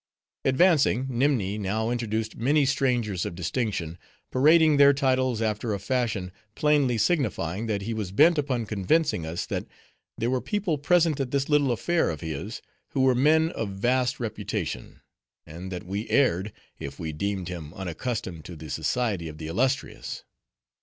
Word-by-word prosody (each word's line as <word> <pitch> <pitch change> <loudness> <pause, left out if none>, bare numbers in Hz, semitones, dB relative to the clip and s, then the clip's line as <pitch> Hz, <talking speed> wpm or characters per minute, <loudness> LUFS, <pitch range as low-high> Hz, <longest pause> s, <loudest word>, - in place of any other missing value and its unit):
Advancing, 135 - +4
Nimni 120 -6 +1
now 110 +3 -1
introduced 110 -2 -2
many 140 +5 +2
strangers 125 -9 0
of - - -4
distinction, 90 - -2 0.3
parading 155 +3 +5
their 140 0 +7
titles 130 -4 +1
after 110 0 -1
a - - -5
fashion, 100 -4 -1 0.2
plainly 145 -6 +2
signifying 110 - 0
that 100 -3 -1
he 115 +3 -3
was 105 -4 -4
bent 155 - +5
upon 130 -5 -1
convincing 105 - +1
us, 85 +2 -3
that - - -4 0.5
there 115 +3 0
were 130 -1 0
people 195 -8 -1
present 160 0 +3
at 135 -2 -1
this 140 +2 -1
little 145 -3 +3
affair 170 +8 +1
of 80 -3 -5
his, 80 -4 -5 0.3
who 135 - +1
were 130 -1 +5
men 155 +5 +4
of 115 -3 -3
vast 125 +6 0
reputation; 105 - -4 0.4
and 85 +4 -8
that 90 - -5
we 100 +5 -4
erred, 105 -7 +2 0.3
if 70 0 -7
we 80 -2 -4
deemed 95 +2 -2
him 85 -4 -6
unaccustomed 95 -1 -4
to 90 - -9
the 80 -2 -9
society 105 -9 -1
of 75 -1 -8
the 80 - -7
illustrious. 130 - -2
115 Hz, 160 wpm, -26 LUFS, 95-135 Hz, 0.5 s, their